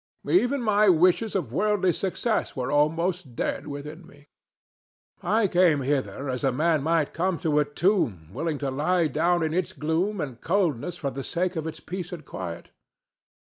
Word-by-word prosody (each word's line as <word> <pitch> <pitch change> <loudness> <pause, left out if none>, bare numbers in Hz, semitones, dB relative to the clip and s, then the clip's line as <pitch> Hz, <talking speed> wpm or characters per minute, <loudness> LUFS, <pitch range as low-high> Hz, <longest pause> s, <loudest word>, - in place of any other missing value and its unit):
Even 280 -6 +2
my 210 -2 +4
wishes 185 +6 +3
of 140 - -2
worldly 200 0 +2
success 205 +6 -1
were 125 -1 -2
almost 160 0 0
dead 145 - -2
within 150 +4 -7
me. 145 -3 -19 0.9
I 220 0 +2
came 175 -5 +3
hither 140 0 -2
as 125 -1 -3
a 135 - +3
man 155 +3 +1
might 160 0 +1
come 180 +1 0
to 150 -2 +1
a 150 - +2
tomb 145 - 0
willing 160 +2 -2
to 135 - -1
lie 165 +6 +1
down 165 +4 +1
in 160 0 -1
its 180 0 -1
gloom 170 +7 -1
and 135 -6 -5
coldness 175 - 0
for 140 -5 -3
the 135 0 -5
sake 180 +4 -1
of 160 -1 -3
its 160 0 -6
peace 180 -1 -6
and 165 -5 -8
quiet. 85 -6 -7
165 Hz, 170 wpm, -26 LUFS, 145-185 Hz, 0.9 s, my